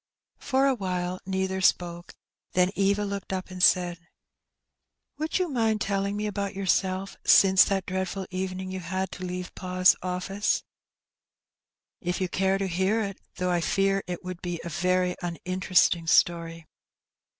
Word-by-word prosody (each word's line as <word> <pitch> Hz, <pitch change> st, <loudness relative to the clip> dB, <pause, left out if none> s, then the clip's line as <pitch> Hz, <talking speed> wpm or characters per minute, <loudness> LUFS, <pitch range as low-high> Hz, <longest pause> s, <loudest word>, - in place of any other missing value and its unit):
For 270 Hz, 0 st, +1 dB
awhile 185 Hz, -8 st, -1 dB
neither 190 Hz, 0 st, -1 dB
spoke^ 175 Hz, -1 st, 0 dB, 0.4 s
then 180 Hz, 0 st, +3 dB
Eva 200 Hz, +1 st, +2 dB
looked 200 Hz, -1 st, -5 dB
up 185 Hz, 0 st, -4 dB
and 185 Hz, 0 st, -6 dB
said 175 Hz, -2 st, +4 dB, 0.6 s
— -, -, -58 dB
"Would 310 Hz, +1 st, -1 dB
you 365 Hz, -1 st, 0 dB
mind 225 Hz, -7 st, +1 dB
telling 200 Hz, 0 st, -1 dB
me 210 Hz, -, -2 dB
about 200 Hz, -2 st, -3 dB
yourself 190 Hz, 0 st, 0 dB
since 190 Hz, -1 st, +7 dB
that 195 Hz, -2 st, -1 dB
dreadful 190 Hz, 0 st, -3 dB
evening 185 Hz, 0 st, -4 dB
you 190 Hz, -, -4 dB
had 185 Hz, +1 st, -3 dB
to 180 Hz, -, -8 dB
leave 180 Hz, 0 st, -5 dB
pa's 185 Hz, 0 st, +3 dB
oflSce?'' 185 Hz, +3 st, -1 dB, 0.7 s
'' -, -, -65 dB
If 180 Hz, -1 st, -2 dB
you 185 Hz, -, 0 dB
care 190 Hz, +2 st, +1 dB
to 195 Hz, -, -2 dB
hear 190 Hz, +5 st, +1 dB
it, 195 Hz, -1 st, -5 dB, 0.2 s
though 180 Hz, 0 st, -1 dB
I 175 Hz, -1 st, +1 dB
fear 195 Hz, +3 st, +1 dB
it 180 Hz, 0 st, -5 dB
would 180 Hz, -1 st, -7 dB
be 175 Hz, -2 st, -4 dB
a 170 Hz, -, -5 dB
very 180 Hz, +2 st, +1 dB
uninteresting 175 Hz, -1 st, +1 dB
story." 165 Hz, 0 st, +2 dB
185 Hz, 155 wpm, -27 LUFS, 180-195 Hz, 0.7 s, since